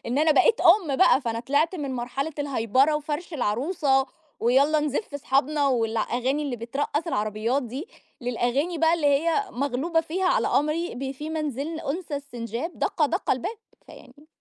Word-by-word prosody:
إن 250 +4 0
أنا 310 0 +4
بقيت 455 +8 +4
أُم 335 -6 +5
بقى، 270 - +5
فأنا 230 -2 -3
طِلِعت 285 +7 +1
من 280 -6 -4
مرحلة 260 +5 -3
الهيبرة 270 +1 +2
وفَرْش 300 +3 -4
العروسة، 270 - +1 0.3
ويالَّا 275 +6 +3
نزِف 295 +2 -3
أصحابنا 285 +1 +1
والأغاني 245 +4 0
اللي 265 -4 -3
بترقَّص 280 +7 -2
العربيات 225 0 -1
دي، 260 - -6 0.3
للأغاني 250 +7 -1
بقى 325 +1 +4
اللي 320 -4 0
هي، 325 +8 +2
مغلوبة 280 +6 0
فيها 350 +4 -2
على - - +2
أمري 305 +4 0
ب 265 +2 -4
"في 295 +3 -6
منزل 305 0 -3
أنثى 315 +1 -4
السنجاب، 245 - -6
دقَّ 305 -3 +1
دقَّ 350 +6 -2
الباب." 380 - -1 0.3
فيعني 300 +1 -16
285 Hz, 155 wpm, -25 LUFS, 250-315 Hz, 0.3 s, أُم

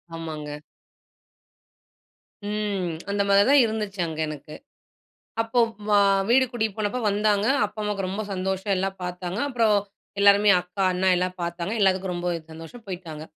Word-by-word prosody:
ஆமாங்க. 155 -2 -6 1.9
ம். 205 -4 -2 0.2
அந்த 200 0 0
மாரி 200 0 +5
தான் 285 0 +7
இருந்துச்சு 210 -3 -4
அங்க 160 -1 -6
எனக்கு. 150 0 -8 0.9
அப்போ 225 +2 0 0.3
வ 210 - +1 0.4
வீடு 260 +2 +5
கூட்டிட்டு 220 -4 -2
போனப்போ 215 +4 -1
வந்தாங்க. 205 0 +1 0.2
அப்பா - - -16
அம்மாவுக்கு 205 -2 -2
ரொம்ப 195 +3 -3
சந்தோஷம். 190 +1 -2
எல்லாம் 195 +1 -2
பார்த்தாங்க. 180 +1 -5
அப்பறம் 225 -5 +3 0.4
எல்லாருமே 200 +1 +6
அக்கா, 180 +2 -5
அண்ணா 185 +1 +1
எல்லாம் 185 +1 -2
பார்த்தாங்க. 170 +3 -3
எல்லாத்துக்கும் 190 -1 +2
ரொம்போ 175 0 -3 0.2
சந்தோஷம், 165 +9 -11
போயிட்டாங்க. 170 -5 -7
195 Hz, 135 wpm, -24 LUFS, 180-210 Hz, 1.9 s, தான்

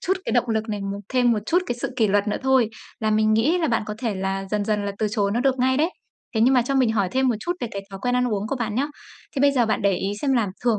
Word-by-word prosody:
chút 380 +2 0
cái - - -2
động 245 -1 +2
lực 220 0 -1
này, 210 -1 -3
một 195 0 -4
thêm 245 -2 +4
một 220 - +1
chút 355 +2 +2
cái 240 - -2
sự - - -2
kỷ 220 - +3
luật 205 +1 +2
nữa - - 0
thôi 265 -4 +3 0.3
là 215 -1 +1
mình 215 0 +3
nghĩ 270 +11 +3
là 325 -3 0
bạn 230 -2 +1
có 210 - -4
thể 230 -4 -2
là 195 +1 -2
dần 210 -1 0
dần 210 -1 0
là 200 - -2
từ 215 - +1
chối 205 -3 0
nó 240 - +1
được 265 0 +1
ngay 260 +1 +2
đấy. 320 +5 +2 0.4
Thế 220 - +1
nhưng 260 +3 +5
mà 250 - +4
cho 275 +3 -2
mình 250 -4 +3
hỏi 200 -4 +1
thêm 260 0 +2
một 235 - +2
chút 350 - -1
về 240 - -2
cái 200 0 -5
thói 195 - -7
quen 245 0 +1
ăn 250 0 +2
uống 205 +1 -2
của 275 - -1
bạn 225 -3 -3
nhá. 270 +4 +1 0.5
Thế 270 - +1
bây 285 0 +5
giờ 245 -4 +2
bạn 215 - 0
để 200 -1 +3
ý 195 +1 -2
xem 275 -2 +2
là 230 -5 +2 0.2
thường 230 -4 +3
230 Hz, 330 wpm, -23 LUFS, 210-260 Hz, 0.5 s, nhưng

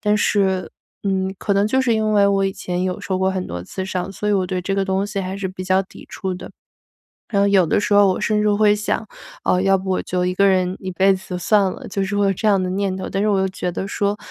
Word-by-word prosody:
但 210 0 +2
是， 195 -3 +1 0.3
嗯， 190 -1 0
可 200 - -1
能 200 +1 +3
就 260 +5 +2
是 240 -3 +2
因 215 -1 +1
为 205 -1 +4
我 195 -1 +2
以 195 - 0
前 180 -1 -3
有 185 -1 -2
受 190 -1 -2
过 190 0 +2
很 185 -1 -3
多 90 0 -5
次 190 - -5
伤， 185 0 -3
所 210 +1 -3
以 - - +3
我 190 -2 +1
对 185 0 -2
这 195 +2 -1
个 195 - +1
东 190 +1 0
西 205 -1 -3
还 190 +1 -4
是 195 -1 -3
比 185 0 -7
较 190 +1 +2
抵 190 - -14
触 190 -1 -4
的。 180 - -9 0.8
然 200 - +3
后 200 - +4
有 195 -2 +4
的 165 - +1
时 205 - 0
候 205 -1 +6
我 185 - 0
甚 210 0 +1
至 210 - +3
会 205 0 +4
想， 215 +1 -2 0.4
呃， 180 - +2
要 195 0 +3
不 190 - -7
我 185 - 0
就 180 0 -1
一 180 - -1
个 200 +1 +3
人 185 -1 +1
一 190 - -5
辈 190 +2 +3
子 185 -1 -6
算 195 +1 +3
了， 260 - -9
就 195 0 -2
是 195 +1 -3
会 205 0 +2
有 195 - +3
这 220 - -3
样 195 -2 +4
的 185 - -1
念 195 0 -1
头。 190 - -5
但 195 - -1
是 215 - +2
我 200 -2 +2
又 190 - +2
觉 180 -1 -3
得 190 - -4
说， 200 0 -1
195 Hz, 310 characters per minute, -20 LUFS, 185-205 Hz, 0.8 s, 候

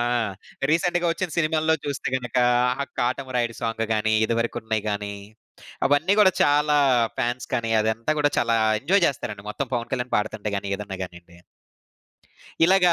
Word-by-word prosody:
ఆ! - - +2 0.7
రీసెంట్‌గా 175 +1 +1
ఒచ్చిన 180 0 -3
సినిమాల్లో 160 0 +2
చూస్తే 140 -1 -3
గనుక, 125 -1 -5 0.4
ఆ - - 0 0.2
'కాటమరాయుడు' 125 -1 -1
సాంగ్ 115 0 -1
గాని, 110 0 +1
ఇదివరకు 115 +1 -1
ఉన్నయి 110 -1 -1
గాని 105 0 -3 0.7
అవన్నీ 145 +7 +2
గూడా 195 -3 +6
చాలా 150 +1 +3 0.4
ఫాన్స్ 120 +1 -2
కని 115 -1 -1
అదంతా 110 +5 -1
గూడా 145 0 +3
చాలా 115 -1 +2 0.3
ఎంజాయ్ 190 0 +3
జేస్తారండి 105 -6 -3
మొత్తం 135 +5 -3
పవన్ 120 -1 -2
కళ్యాణ్ 125 -1 -2
పాడుతుంటే 105 0 -2
గాని 100 0 -4
ఏదన్నా 100 -2 -6
గానియండి. 85 -1 -14 1.3
ఇలాగా 180 0 +5
120 Hz, 145 wpm, -24 LUFS, 110-150 Hz, 1.3 s, గూడా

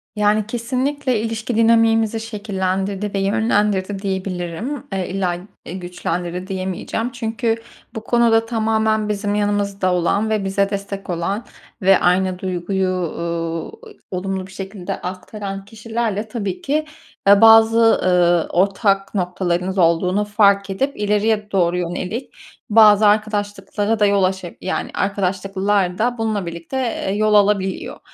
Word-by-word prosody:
Yani, 210 0 +2
kesinlikle 255 +2 -1
ilişki 225 +1 -3
dinamiğimizi 225 -1 +3
şekillendirdi 200 -2 -3
ve 200 - 0
yönlendirdi 205 -1 +1
diyebilirim. 190 - -3
Eee, 185 -2 -2
illa, 185 -2 -1 0.3
eee, - - -7
güçlendirdi 180 0 -4
diyemeyeceğim. 190 +5 -3
Çünkü 225 0 -1 0.4
bu 220 - -5
konuda 230 -2 +3
tamamen 220 -1 0
bizim 205 0 -1
yanımızda 200 -2 0
olan 200 +5 +1
ve 215 -2 0
bize 195 +1 +1
destek 200 -1 -5
olan 185 +7 -2 0.4
ve 195 0 +5
aynı 180 +1 +1
duyguyu, 185 +1 -1
ııı, 170 - -3 0.4
olumlu 190 0 -3
bir - - -15
şekilde 195 -1 -6
aktaran 195 +2 -6
kişilerle 220 0 -3
tabii 200 -5 -4
ki, 305 +2 0 0.4
eee, 200 +1 +7
bazı, 225 0 +6
eee, 175 -2 +3
ortak 195 +2 +1
noktalarınız 180 0 -1
olduğunu 180 +4 +2
fark 200 -1 +3
edip 270 +9 -2
ileriye 210 0 0
doğru 180 -2 +2
yönelik 180 +7 -4 0.4
bazı 210 -1 +6
arkadaşlıklara 205 0 0
da 210 - +4
yol 200 -1 +3
aşa 185 -2 -1
yani, 190 - -3
arkadaşlıklar 195 -1 0
da 245 +3 0
bununla 215 -4 -1
birlikte, 170 +10 -6
eee, 235 -6 -2
yol 215 0 +2
alabiliyor. 200 -2 +1
200 Hz, 125 wpm, -20 LUFS, 185-220 Hz, 0.4 s, eee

